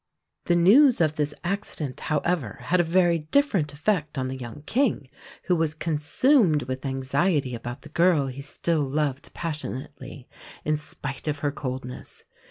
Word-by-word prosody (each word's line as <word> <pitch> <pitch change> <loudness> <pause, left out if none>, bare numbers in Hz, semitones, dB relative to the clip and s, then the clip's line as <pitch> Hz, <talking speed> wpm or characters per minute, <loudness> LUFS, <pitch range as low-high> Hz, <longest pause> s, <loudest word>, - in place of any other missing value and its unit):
The 175 - +3
news 235 - +6
of 155 -2 +2
this 150 -1 0
accident, 175 -7 -3
however, 150 - -1
had 180 +8 +1
a - - +5
very 170 0 +3
different 165 - +1
effect 150 -1 -1
on 130 -1 -1
the 130 - -4
young 125 +2 -8
King, 220 - 0 0.3
who 180 - +2
was 160 -2 0
consumed 160 - +2
with 130 +2 -4
anxiety 135 +2 0
about 120 +3 -6
the 155 - -11
girl 170 -2 +3
he 135 +1 -6
still 155 +3 0
loved 140 -1 -2
passionately, 145 -4 -6 0.4
in 155 - +2
spite 145 -2 -6
of 150 -1 0
her 145 - +2
coldness. 130 -3 -6
150 Hz, 155 wpm, -25 LUFS, 135-175 Hz, 0.4 s, news